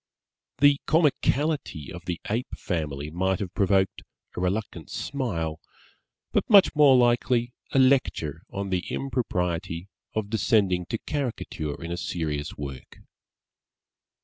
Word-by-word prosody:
The 145 +1 +5
comicality 150 - +1
of 90 +1 -9
the 90 -2 -3
Ape 115 +4 -2
family 75 -4 -3
might 95 +3 +1
have 90 -3 -4
provoked 95 -1 +2 0.3
a - - -3
reluctant 90 -3 -2
smile, 85 - -3 0.7
but - - 0
much 200 -4 +7
more 145 -3 +7
likely 120 0 +2 0.2
a - - +1
lecture 130 - +2
on 100 -1 -4
the 90 -1 0
impropriety 90 -8 -2 0.3
of 110 -1 -2
descending 100 -5 +2
to 115 - -2
caricature 115 - -4
in 85 0 -6
a 85 - -2
serious 75 -4 -3
work. 70 -3 -8
95 Hz, 120 wpm, -26 LUFS, 85-125 Hz, 0.7 s, much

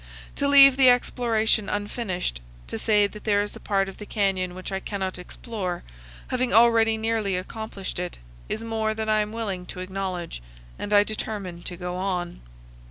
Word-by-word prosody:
To 280 - +1
leave 275 -1 +8
the 265 -2 +7
exploration 230 -4 +2
unfinished, 205 - -2 0.2
to - - -5
say 210 -2 +4
that 210 +1 -7
there 205 -2 +3
is 205 - -7
a - - -9
part 195 -2 0
of 195 - -9
the 210 - -8
canyon 190 -4 0
which 185 +1 -6
I 190 - -1
cannot 190 -2 -4
explore, 185 -1 -5 0.5
having 255 -1 0
already 225 0 +5
nearly 220 -3 0
accomplished 195 0 -5
it, 180 0 -4 0.3
is 220 - -3
more 220 -1 -1
than 220 0 -2
I 215 0 +4
am 210 0 -1
willing 200 -6 -4
to 180 - -7
acknowledge, 185 - -4 0.4
and 205 - -5
I 205 0 +7
determine 205 -4 -4
to 175 0 -6
go 180 0 -4
on. 180 - -2
205 Hz, 175 wpm, -25 LUFS, 185-225 Hz, 0.5 s, leave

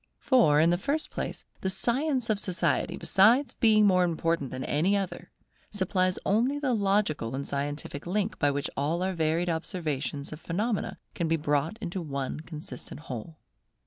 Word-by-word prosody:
For, 225 - +4
in 165 +2 +5
the 175 - +1
first 290 +7 -1
place, - - -5
the 190 - -1
science 255 +3 +1
of 210 - 0
Society, 185 -3 0
besides 235 +9 +4
being 215 -3 +4
more 185 -2 +5
important 165 -4 0
than 130 +1 -5
any 180 +10 +2
other, 195 -2 -4 0.4
supplies 185 -2 0
the - - -7
only 240 +8 +2
logical 200 - +1
and 140 +1 -4
scientific 145 +1 -4
link 205 +3 -1
by 145 - +3
which 145 0 -2
all 160 +6 0
our 190 0 0
varied 165 +1 0
observations 155 -4 -3
of 155 - -8
phenomena 205 +5 -2 0.2
can 170 - -1
be 165 +1 +2
brought 150 +5 0
into 185 -3 -4
one 140 -3 -4
consistent 155 -1 -8
whole. 145 +3 -7
175 Hz, 165 wpm, -28 LUFS, 150-210 Hz, 0.4 s, in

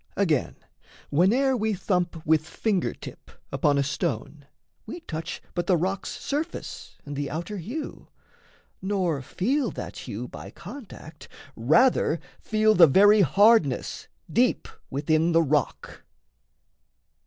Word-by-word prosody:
Again, 160 -10 +1 0.6
whene'er 240 - +3
we 220 -2 0
thump 180 -3 -2
With 155 0 +3
finger 200 0 -1
tip - - -11 0.2
upon 145 -1 +2
a 140 - +2
stone, 140 - -3 0.4
we 345 - -7
touch 165 - -6
But 175 0 -2
the 185 - +4
rock's 190 +4 -2
surface 305 +4 -5
and 145 0 -6
the 140 0 -3
outer 175 +7 -5
hue, 240 - -6 0.7
Nor 185 -7 -1
feel 255 - -1
that - - -7
hue - - -5
by - - -10
contact 190 - -11 0.3
rather 160 - +3 0.2
feel 215 0 +2
The 175 -5 +8
very 205 +8 +6
hardness 195 - +3 0.2
deep - - +1 0.2
within 155 +4 +1
the 165 0 +5
rock. 150 -1 -2
175 Hz, 120 wpm, -25 LUFS, 155-215 Hz, 0.7 s, The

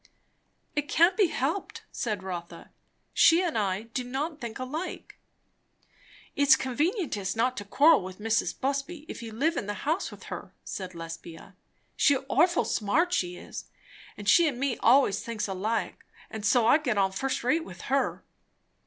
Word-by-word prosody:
"It 295 0 -1
can't 340 +3 +4
be 410 -4 +4
helped," 315 +6 -3
said 210 -6 -3
Rotha. 175 -2 -7 0.4
"She 335 +2 +6
and 345 -7 -1
I 200 -2 0
do 230 +3 -4
not 285 +5 -4
think 235 -2 -5
alike." 295 +8 -6 1.2
"It's 280 -1 +6
convenientest 265 - -1
not 250 +3 +1
to 205 - -5
quarrel 295 +9 +5
with 185 0 -8
Mrs. 225 +1 -1
Busby 280 +4 -2
if - - -7
you 230 -1 -7
live 305 +10 0
in 200 - -3
the 205 - -3
house 320 +6 0
with - - -12
her," - - -8
said 185 -2 -6
Lesbia. 165 0 -9 0.4
"She's 285 -2 +4
orful 345 +4 +3
smart, 320 - +1
she 180 - -1
is. - - -8 0.5
But 205 - -9
she 330 - +6
and 260 -5 -2
me 270 -2 -1
allays 260 -7 +4
thinks 230 -2 -4
just 195 - -4
alike, 215 +5 -2 0.3
and 220 -1 -6
so 230 +2 +3
I 270 +7 +6
get 245 -9 -1
on 190 -1 +2
first 265 +7 -2
rate 315 +7 +2
with 180 - -11
her." 275 +2 -1
250 Hz, 170 wpm, -28 LUFS, 205-300 Hz, 1.2 s, She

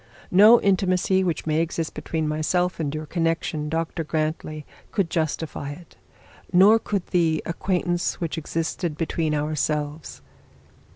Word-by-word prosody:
No 210 +6 +8
intimacy 190 -1 +2
which 175 -3 -2
may 155 0 +1
exist 165 -1 -3
between 155 +1 -3
myself 175 +4 0
and 150 -3 -1
your 155 0 -4
connection, 165 -2 -1
Dr 165 +1 -2
Grantly, 155 -1 -3 0.3
could 190 -5 0
justify 155 -3 -2
it. 170 +3 -15 0.6
Nor 195 +5 +6
could 200 -4 -2
the 165 -3 +2
acquaintance 175 0 -1
which 165 -3 -2
existed 160 0 -3
between 160 -1 -1
ourselves.' 150 0 -2
165 Hz, 125 wpm, -24 LUFS, 155-180 Hz, 0.6 s, No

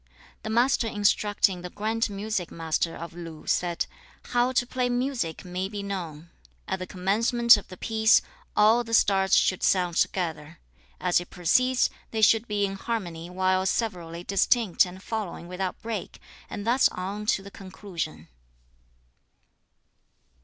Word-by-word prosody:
The 220 - -6
Master 240 +1 +2
instructing 205 -3 +1
the 180 - -6
grand 220 +4 -1
music 200 -3 -3
master 165 0 -1
of 170 0 -8
Lu 165 -2 -9
said, 175 -1 0 0.4
'How 245 +1 +2
to 245 - +2
play 250 0 -1
music 245 -10 -2
may 185 +1 -3
be 205 -1 -5
known. 170 -5 -6 0.4
At - - -2
the 185 - -5
commencement 230 +6 +4
of 205 - -6
the 185 - -11
piece, 220 +2 +3 0.3
all 220 +3 +5
the 230 -1 +4
parts 195 -1 +3
should 185 - +2
sound 180 -3 +2
together. 160 -3 -1 0.4
As 180 -1 +2
it 175 - -9
proceeds, 250 +9 +2 0.2
they 220 -1 -2
should 225 +2 +5
be 205 -1 0
in 195 0 -4
harmony 175 -7 -4
while 185 +1 +1
severally 175 -6 -2
distinct 195 0 +2
and 185 +2 -11
flowing 210 -6 -4
without 180 +1 -4
break, 220 -4 -5 0.3
and 205 - -6
thus 245 +3 +4
on 200 +3 -5
to 195 - +1
the 200 - -11
conclusion.' 185 - -7
195 Hz, 145 wpm, -26 LUFS, 180-220 Hz, 0.4 s, all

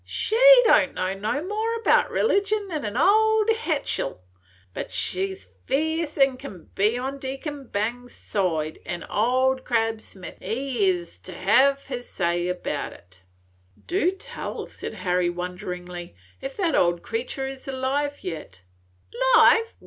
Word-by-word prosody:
She 440 - -2 0.3
don' - - +4
know 185 +1 -1
no 215 +10 -2
more 440 +4 -2
'bout - - +4
religion 405 -2 +1
than 310 -5 -3
an' 210 +3 -3
old 435 - +4
hetchel, 315 - -2 0.5
but - - -5
she 185 - -1
's 90 - -18 0.2
ferce 315 +2 0
as 270 -2 +4
can 200 - -10
be 210 +4 +2
on 270 +2 -4
Deacon 275 +1 -6
Bangs's 240 +4 -3
side, 160 -6 -2
an' 175 -1 -5
Old 260 +4 +1
Crab 225 -2 0
Smith 185 -4 -11
he 245 -4 -1
hes 175 - -6
to 90 - -10
hev' 270 +8 +3
his 245 -2 -6
say 175 0 0
'bout 180 - -4
it." 90 +1 -18 0.6
"Do 360 0 +2
tell," 385 +2 -6
said - - -8
Harry, 180 -1 0
wonderingly, 180 0 -6 0.3
"if - - -6
that 350 -6 +1
old 175 -1 +2
creature 250 +4 -3
is 270 0 -8
alive 275 +2 -2
yet!" 155 - -7 0.7
"'Live? 455 0 +5
250 Hz, 140 wpm, -25 LUFS, 180-300 Hz, 0.7 s, Live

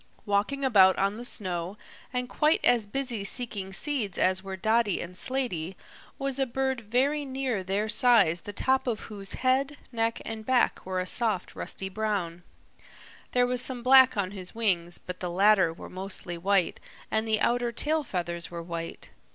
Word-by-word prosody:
Walking 210 +8 0
about 195 -7 +6
on 195 +1 +1
the 230 +3 -7
snow, 185 -4 -3 0.3
and 250 -1 -1
quite 300 +5 +2
as 235 -4 +4
busy 240 -2 -2
seeking 200 -4 -3
seeds 235 -3 -1
as 185 0 +2
were 190 0 -6
Dotty 220 0 +2
and 180 +1 -6
Slaty, 190 -8 -1 0.4
was 275 -1 -2
a 270 - +2
bird 265 0 -1
very 265 +7 +1
near 260 -7 -2
their 195 +3 -1
size 215 -7 +4
the 205 - -7
top 265 +5 +1
of 225 -3 -1
whose 200 -3 -7
head, 270 +3 +1
neck 230 -1 0
and 220 -1 -5
back 255 +2 +2
were 185 -1 -1
a 185 - -1
soft 210 -2 -1
rusty 190 - -4
brown. 190 -4 -2 0.9
There 245 0 +4
was 250 0 -1
some 250 -1 -4
black 260 -1 +7
on 190 -2 0
his 185 -1 -8
wings, 175 -6 +1
but 180 0 -8
the 180 - -3
latter 190 -1 +4
were 165 - -10
mostly 185 -1 -6
white 190 +1 +1 0.3
and 220 +1 +1
the 215 -1 +2
outer 240 +2 +1
tail 305 +6 -1
feathers 170 - -4
were 170 -1 -6
white. 165 -1 -6
215 Hz, 175 wpm, -28 LUFS, 185-250 Hz, 0.9 s, black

